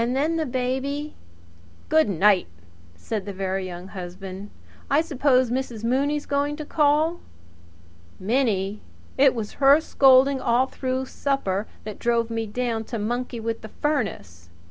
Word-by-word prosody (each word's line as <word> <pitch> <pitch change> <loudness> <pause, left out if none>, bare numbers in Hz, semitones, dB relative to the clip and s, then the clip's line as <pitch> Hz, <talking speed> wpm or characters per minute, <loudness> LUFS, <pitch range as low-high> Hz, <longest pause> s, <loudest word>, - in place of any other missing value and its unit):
Then 275 +7 0
the 315 -2 -1
baby 265 +4 -2 0.4
" 85 0 -26
"Good 315 -5 +4
night!" 195 +1 +3 0.5
said 205 - -5
the 200 - -4
Very 190 0 -2
Young 180 +1 -8
Husband. 190 +2 -8 0.4
"I 285 - +4
suppose 275 -6 +2
Mrs. 245 -4 -3
Mooney's 280 +5 0
going 285 +1 0
to 305 0 -7
call?" 305 +3 +2 1.0
"Minnie! 210 -2 0 0.3
It 270 -1 +4
was 215 -3 -4
her 280 +3 +8
scolding 270 -3 +4
all 245 +2 +3
through 260 0 -3
supper 220 -8 -2 0.2
that 215 -1 -7
drove 235 -1 +1
me 225 -1 -2
down 230 0 -2
to 235 - -5
monkey 240 +3 -3
with 225 0 -3
the 220 - -9
furnace. 165 - -3
245 Hz, 145 wpm, -24 LUFS, 205-275 Hz, 1.0 s, her